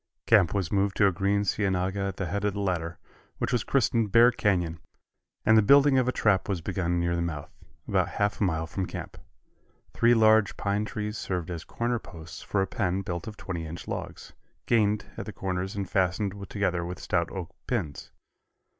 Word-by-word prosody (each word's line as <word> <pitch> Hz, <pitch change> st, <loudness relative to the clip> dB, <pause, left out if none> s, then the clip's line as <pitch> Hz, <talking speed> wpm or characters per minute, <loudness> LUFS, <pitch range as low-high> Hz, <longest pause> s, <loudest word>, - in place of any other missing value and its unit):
Camp 85 Hz, -, +5 dB
was 95 Hz, -5 st, -1 dB
moved 100 Hz, -1 st, +1 dB
to 105 Hz, -, +5 dB
a 100 Hz, -, +5 dB
green 100 Hz, +3 st, +1 dB
cienaga 95 Hz, -1 st, 0 dB
at 95 Hz, -1 st, -2 dB
the 95 Hz, -, -2 dB
head 100 Hz, +4 st, -2 dB
of 105 Hz, -1 st, 0 dB
the -, -, -3 dB
latter, 85 Hz, -4 st, -2 dB, 0.4 s
which -, -, -2 dB
was 120 Hz, -, +1 dB
christened 115 Hz, -5 st, +1 dB
Bear 120 Hz, +3 st, +7 dB
Canyon, 90 Hz, -7 st, 0 dB, 0.7 s
and 110 Hz, -, +6 dB
the 110 Hz, -, +7 dB
building 140 Hz, +4 st, +6 dB
of 125 Hz, -, +1 dB
a -, -, +3 dB
trap 105 Hz, -6 st, +1 dB
was 95 Hz, -3 st, 0 dB
begun 90 Hz, 0 st, -1 dB
near 85 Hz, 0 st, 0 dB
the 85 Hz, -, -1 dB
mouth 75 Hz, -4 st, -4 dB, 0.4 s
about -, -, +2 dB
half 100 Hz, +1 st, -1 dB
a -, -, +4 dB
mile 80 Hz, -4 st, 0 dB
from 90 Hz, +3 st, -3 dB
camp. -, -, -7 dB, 0.8 s
Three 120 Hz, +1 st, +4 dB
large 110 Hz, -2 st, +4 dB
pine 100 Hz, +1 st, 0 dB
trees 105 Hz, -1 st, -4 dB
served 90 Hz, -2 st, -3 dB
as 85 Hz, -1 st, -5 dB
corner 120 Hz, 0 st, -2 dB
posts 85 Hz, -6 st, -10 dB
for 95 Hz, -2 st, 0 dB
a -, -, 0 dB
pen 95 Hz, 0 st, -1 dB
built 85 Hz, +3 st, -4 dB
of 105 Hz, -2 st, -7 dB
twenty 85 Hz, -4 st, -5 dB
inch 85 Hz, +2 st, -8 dB
logs, -, -, -6 dB, 0.3 s
"gained" 105 Hz, -2 st, +2 dB
at -, -, -5 dB
the -, -, -4 dB
corners 95 Hz, 0 st, -3 dB
and 100 Hz, -2 st, -3 dB
fastened 95 Hz, +2 st, 0 dB, 0.2 s
together 90 Hz, -4 st, 0 dB
with 90 Hz, +1 st, -5 dB
stout 85 Hz, -2 st, -1 dB
oak 90 Hz, -3 st, -7 dB
pins. 90 Hz, -, -3 dB
95 Hz, 200 wpm, -27 LUFS, 90-105 Hz, 0.8 s, Bear